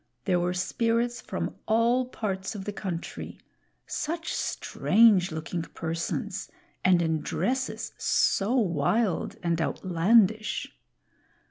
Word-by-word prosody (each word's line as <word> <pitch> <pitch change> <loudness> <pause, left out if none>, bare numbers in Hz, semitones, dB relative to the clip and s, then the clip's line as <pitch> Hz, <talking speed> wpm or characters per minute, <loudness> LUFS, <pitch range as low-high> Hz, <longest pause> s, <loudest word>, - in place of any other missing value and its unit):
There 180 -3 +2
were 175 +1 0
Spirits 230 +6 0
from - - -4
all 235 +3 +3
parts 195 -5 -4
of 195 -2 -6
the 205 - -3
country; 180 -4 -5 0.5
such 330 +2 -3
strange 205 -5 +3
looking 160 +2 -3
persons, 165 +6 -4 0.3
and 180 -2 +4
in 160 -2 0
dresses 260 +1 -2
so 205 +6 +2
wild 200 - +1
and 170 -1 +1
outlandish! 205 +6 +2
195 Hz, 105 wpm, -27 LUFS, 175-230 Hz, 0.5 s, and